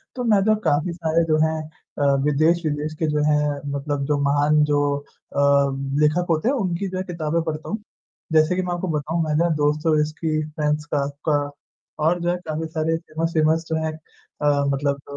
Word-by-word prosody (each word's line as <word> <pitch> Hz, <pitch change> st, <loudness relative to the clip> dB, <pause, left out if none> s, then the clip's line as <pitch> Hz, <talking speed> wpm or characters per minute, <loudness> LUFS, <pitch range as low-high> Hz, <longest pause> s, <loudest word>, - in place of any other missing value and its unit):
तो 250 Hz, -, -3 dB
मैं 210 Hz, -4 st, +4 dB
जो 215 Hz, +1 st, +4 dB
काफ़ी 150 Hz, +4 st, +1 dB
सारे 165 Hz, 0 st, +1 dB
जो 155 Hz, -1 st, +3 dB
हैं 160 Hz, 0 st, -1 dB, 0.4 s
अ, 140 Hz, -1 st, +3 dB
विदेश-विदेश 155 Hz, 0 st, +1 dB
के 160 Hz, -, +1 dB
जो 150 Hz, 0 st, 0 dB
हैं 150 Hz, -1 st, +1 dB, 0.2 s
मतलब 140 Hz, 0 st, -2 dB
जो 150 Hz, 0 st, +1 dB
महान 145 Hz, +2 st, +3 dB
जो 145 Hz, -1 st, +2 dB, 0.2 s
अ, 145 Hz, 0 st, -9 dB, 0.6 s
लेखक 155 Hz, +4 st, +3 dB
होते 160 Hz, +7 st, +1 dB
हैं 280 Hz, -, +1 dB
उनकी 195 Hz, -3 st, -1 dB
जो 185 Hz, -, -4 dB
है 185 Hz, -, -1 dB
किताबें 165 Hz, -2 st, -2 dB
पढ़ता 160 Hz, -1 st, -4 dB
हूँ, 215 Hz, -, -1 dB, 0.6 s
जैसे 155 Hz, +3 st, +4 dB
कि 185 Hz, -, 0 dB
मैं 180 Hz, -1 st, -2 dB
आपको 175 Hz, +1 st, -3 dB
बताऊँ 160 Hz, +3 st, -1 dB
मैं 155 Hz, -1 st, -1 dB
ना 170 Hz, -, +2 dB
दोस्तोयेव्स्की, 155 Hz, +1 st, +1 dB
फ्रांज 150 Hz, 0 st, -1 dB
काफ्का 145 Hz, +1 st, 0 dB, 0.6 s
और 175 Hz, +3 st, +2 dB
जो 175 Hz, +1 st, +1 dB
काफ़ी 160 Hz, +1 st, -3 dB
सारे 160 Hz, 0 st, -1 dB
फ़ेमस-फ़ेमस 160 Hz, 0 st, 0 dB
जो 160 Hz, -, 0 dB
हैं 155 Hz, -, -2 dB, 0.5 s
अ, 145 Hz, -1 st, +2 dB
मतलब 140 Hz, 0 st, -1 dB
155 Hz, 180 wpm, -22 LUFS, 150-170 Hz, 0.6 s, मैं